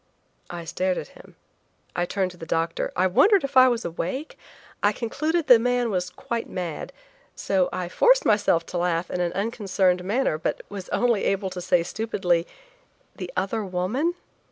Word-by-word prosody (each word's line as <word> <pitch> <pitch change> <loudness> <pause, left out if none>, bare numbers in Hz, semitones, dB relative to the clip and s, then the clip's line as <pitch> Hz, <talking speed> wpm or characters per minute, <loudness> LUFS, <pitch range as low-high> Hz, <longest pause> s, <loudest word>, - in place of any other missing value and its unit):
I 170 -1 -6
stared 185 +2 -1
at - - -5
him; - - -17 0.6
I 175 - +1
turned 190 -1 -1
to 180 - -15
the 165 - -9
doctor; 165 +1 -1
I 185 - +2
wondered 390 - +4
if 275 0 -4
I 255 0 +8
was 240 -2 0
awake; 175 - -4 0.5
I 205 - +4
concluded 305 +9 -1
the 245 -5 +8
man 245 -1 +1
was 180 -2 -1
quite 230 +5 -5
mad, 175 -4 -5 0.4
so 190 -2 +1
I 180 -1 -3
forced - - +4
myself 175 -5 +3
to 175 - 0
laugh 175 0 -1
in 180 - -1
an 175 -1 0
unconcerned 195 -4 0
manner, 205 -4 0
but - - -2
I - - -17
was 195 -2 -7
only 235 -4 +1
able 195 -1 0
to 180 0 -5
say 175 -1 +2
stupidly: 180 -5 -1 0.7
"The - - -6
other 215 +3 -1
woman?" 205 - -1
190 Hz, 180 wpm, -25 LUFS, 180-235 Hz, 0.7 s, I